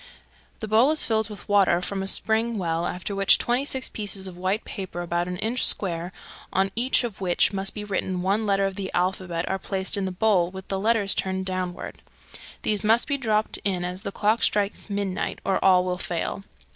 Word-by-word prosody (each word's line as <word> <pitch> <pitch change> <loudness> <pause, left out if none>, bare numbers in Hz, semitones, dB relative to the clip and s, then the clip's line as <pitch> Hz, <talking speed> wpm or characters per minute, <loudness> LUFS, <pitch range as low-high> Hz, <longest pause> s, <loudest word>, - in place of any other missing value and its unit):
The 220 - -4
bowl 225 +6 +4
is 310 0 +4
filled 220 -1 0
with 210 - -10
water 200 -4 +4
from 195 +2 -3
a 195 - -2
spring 225 +3 +3
well, 170 -2 -1
after 180 +3 -4
which 195 0 +5
twenty 245 +3 0
six 265 -2 -1
pieces 200 -2 -4
of 185 - -9
white 185 +4 -1
paper 185 -3 -5
about 175 0 -1
an 180 0 -4
inch 225 +5 -1
square, 175 -2 +2 0.4
on 195 +1 +1
each 250 +3 +2
of 225 -5 -5
which 180 +1 +2
must 195 0 -1
be 210 - -5
written 190 -3 -2
one 205 +3 +1
letter 195 0 +2
of 195 - -2
the 190 -1 -3
alphabet, 180 -1 -1
are 190 - -1
placed 190 0 +1
in 195 - -1
the 190 - -2
bowl 185 -2 +2
with 190 0 -10
the 195 - -1
letters 210 -1 +2
turned 190 0 -2
downward. 185 -1 -4 0.6
These 210 -1 0
must 225 +3 +4
be 280 -2 0
dropped 215 -3 0
in 185 -3 -1
as 180 +1 -4
the 200 -2 -5
clock 215 +3 +1
strikes 205 +1 0
midnight, 200 -2 -2
or 195 - 0
all 185 -1 +5
will 180 -1 -2
fail. 175 +3 -3
195 Hz, 210 wpm, -25 LUFS, 185-215 Hz, 0.6 s, which